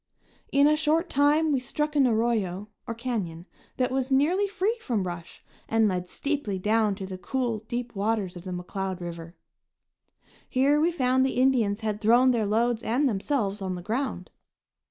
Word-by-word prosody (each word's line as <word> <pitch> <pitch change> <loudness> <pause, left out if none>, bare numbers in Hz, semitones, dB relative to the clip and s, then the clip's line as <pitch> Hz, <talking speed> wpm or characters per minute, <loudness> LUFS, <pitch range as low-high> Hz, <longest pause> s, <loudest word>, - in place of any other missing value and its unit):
In 280 +1 +5
a 300 +1 +5
short 320 +3 +1
time 295 +3 +3
we 275 - +2
struck 300 +4 -3
an 275 -3 +5
arroyo, 215 -4 0 0.2
or 230 - -3
canyon, 205 -9 -4 0.3
that 255 0 +1
was 265 0 -1
nearly 320 +10 +3
free 400 +3 0
from 230 - -1
brush 175 -2 -7 0.3
and 225 -1 +3
led 180 -2 -2
steeply 280 -9 -2
down 210 +1 +1
to 190 -1 -6
the 190 -1 -7
cool, 245 -1 -2
deep 240 0 -4
waters 200 -2 -1
of 175 - -9
the 185 - -7
McCloud 185 +1 -4
River. 170 -1 -7 1.1
Here 280 +3 +3
we 335 +2 +3
found 260 -5 +2
the 265 -1 0
Indians 235 -6 +2
had 215 -1 -2
thrown 240 +4 +5
their 225 -4 0
loads 230 +2 +1
and 250 +6 +1
themselves 205 -2 -1
on 185 -1 -2
the 175 - -7
ground. 250 +8 -3
230 Hz, 175 wpm, -27 LUFS, 195-270 Hz, 1.1 s, In